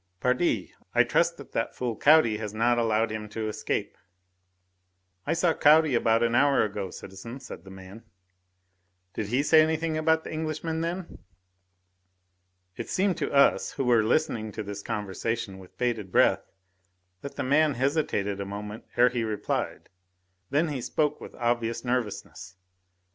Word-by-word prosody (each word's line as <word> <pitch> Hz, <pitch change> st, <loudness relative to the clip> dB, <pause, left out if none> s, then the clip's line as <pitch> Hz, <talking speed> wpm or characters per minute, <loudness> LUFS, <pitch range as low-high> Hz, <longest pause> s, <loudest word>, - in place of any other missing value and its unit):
"Pardi! 125 Hz, -, 0 dB, 0.2 s
I -, -, +6 dB
trust -, -, +1 dB
that -, -, -12 dB
that -, -, -2 dB
fool 120 Hz, -3 st, -2 dB
Caudy 140 Hz, -4 st, +5 dB
has 105 Hz, -1 st, -5 dB
not 120 Hz, +2 st, +2 dB
allowed 115 Hz, -1 st, +1 dB
him 110 Hz, -1 st, -5 dB
to 110 Hz, 0 st, -4 dB
escape." 110 Hz, -, -3 dB, 1.3 s
"I -, -, +2 dB
saw 170 Hz, 0 st, +2 dB
Caudy 155 Hz, -1 st, +5 dB
about 115 Hz, -1 st, +3 dB
an 115 Hz, 0 st, +1 dB
hour 140 Hz, +2 st, +4 dB
ago, 100 Hz, -2 st, -3 dB
citizen," 100 Hz, +8 st, -9 dB
said 130 Hz, -, -10 dB
the 95 Hz, -, -13 dB
man. 95 Hz, +3 st, -11 dB, 1.1 s
"Did 105 Hz, -, -3 dB
he 125 Hz, +6 st, +1 dB
say 155 Hz, +1 st, +6 dB
anything 160 Hz, 0 st, 0 dB
about 160 Hz, 0 st, +2 dB
the -, -, -7 dB
Englishman 160 Hz, +1 st, -3 dB
then?" 170 Hz, +2 st, -4 dB, 1.6 s
It -, -, -6 dB
seemed 190 Hz, -2 st, +1 dB
to -, -, -2 dB
us, 140 Hz, 0 st, +3 dB
who 135 Hz, -, -2 dB
were 120 Hz, -3 st, +4 dB
listening 110 Hz, -3 st, 0 dB
to 110 Hz, -, -4 dB
this 100 Hz, 0 st, -6 dB
conversation 105 Hz, -1 st, -3 dB
with 95 Hz, -1 st, -16 dB
bated 115 Hz, -6 st, -2 dB
breath, -, -, +3 dB, 0.7 s
that 140 Hz, -, -8 dB
the -, -, -2 dB
man 145 Hz, +2 st, +3 dB
hesitated 120 Hz, -7 st, 0 dB
a -, -, -1 dB
moment 105 Hz, +2 st, -7 dB
ere 125 Hz, +1 st, +6 dB
he 120 Hz, -1 st, -2 dB
replied; 110 Hz, -2 st, -3 dB, 0.6 s
then 155 Hz, +4 st, +1 dB
he 140 Hz, -4 st, -3 dB
spoke 150 Hz, +3 st, -1 dB
with -, -, -10 dB
obvious 120 Hz, 0 st, -1 dB
nervousness. 105 Hz, -5 st, -3 dB
120 Hz, 155 wpm, -27 LUFS, 105-150 Hz, 1.6 s, I